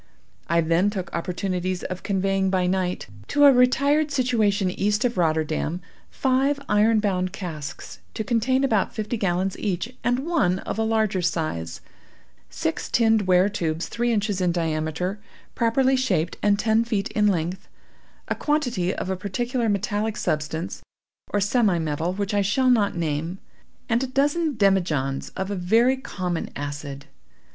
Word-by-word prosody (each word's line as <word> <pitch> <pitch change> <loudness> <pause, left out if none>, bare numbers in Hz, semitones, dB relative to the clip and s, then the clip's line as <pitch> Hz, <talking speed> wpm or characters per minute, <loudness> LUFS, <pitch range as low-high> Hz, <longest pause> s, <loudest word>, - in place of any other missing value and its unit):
I 170 +1 +3
then 165 +5 +2
took 190 -4 -5
opportunities 180 +1 -2
of 185 0 -5
conveying 195 -1 0
by 185 -1 +1
night, 180 0 -1 0.2
to 290 0 +4
a 280 - +9
retired 280 +5 +3
situation 220 -8 +1
east 210 +5 0
of 245 - 0
Rotterdam, 160 0 0 0.3
five 270 +2 +1
iron 215 +2 +4
bound 185 -3 0
casks, 160 -7 -7 0.2
to 220 - -2
contain 240 +5 +1
about 220 -7 +1
fifty 215 +2 -2
gallons 190 -2 0
each, 210 +5 -2
and 245 +3 0
one 295 - +2
of 205 - -5
a - - +2
larger 220 -4 +1
size; 155 - -2 0.7
six 160 - -3
tinned 220 -4 +3
ware 185 +1 +5
tubes, 165 -4 -2
three 240 +1 0
inches 205 -3 0
in 180 -1 +2
diameter, 165 +3 -2 0.3
properly 260 +3 +2
shaped, 185 -11 0
and 205 -1 +3
ten 220 +1 +2
feet 215 -4 -2
in 210 -1 +2
length; 180 0 -1 0.6
a - - 0
quantity 245 - 0
of 190 - -3
a - - 0
particular 235 +5 -2
metallic 205 +2 -1
substance, 155 +3 -2 0.5
or 205 - +1
semi 205 -2 +2
metal, 160 +1 -1
which 200 +2 -3
I 205 - +3
shall 255 +6 +2
not 210 -5 +2
name, 165 +2 -2 0.5
and 235 +2 +1
a - - -2
dozen 290 +4 +1
demijohns 170 -10 +1
of 190 +1 -3
a - - -1
very 225 +8 +3
common 180 -9 -4
acid. 145 -1 -6
200 Hz, 150 wpm, -24 LUFS, 175-230 Hz, 0.7 s, a